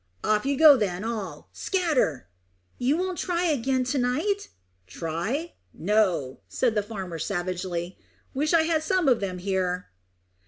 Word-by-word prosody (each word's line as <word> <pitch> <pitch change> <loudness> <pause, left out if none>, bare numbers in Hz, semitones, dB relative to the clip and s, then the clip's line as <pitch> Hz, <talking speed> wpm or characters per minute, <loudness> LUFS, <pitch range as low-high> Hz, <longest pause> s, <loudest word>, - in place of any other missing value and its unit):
"Off 215 +4 +1
you 280 -1 +1
go 310 -1 +9
then 195 -4 -1
all. 220 -4 -5
Scatter!" 300 - 0 0.5
"You 265 +5 +2
won't 370 0 -2
try 350 -1 0
again 265 -5 +1
to 255 +2 -1
night?" 315 +12 0 0.4
"Try? 170 - -3 0.2
No," 180 -9 +1
said 245 -3 +1
the 210 - +2
farmer 190 -6 -6
savagely. 180 -1 -3 0.3
"Wish 295 +3 0
I 335 -2 +5
had 320 -1 +1
some 355 0 +1
of 245 -3 +4
them 185 -2 -3
here!" 180 -1 -1
230 Hz, 145 wpm, -26 LUFS, 185-310 Hz, 0.5 s, go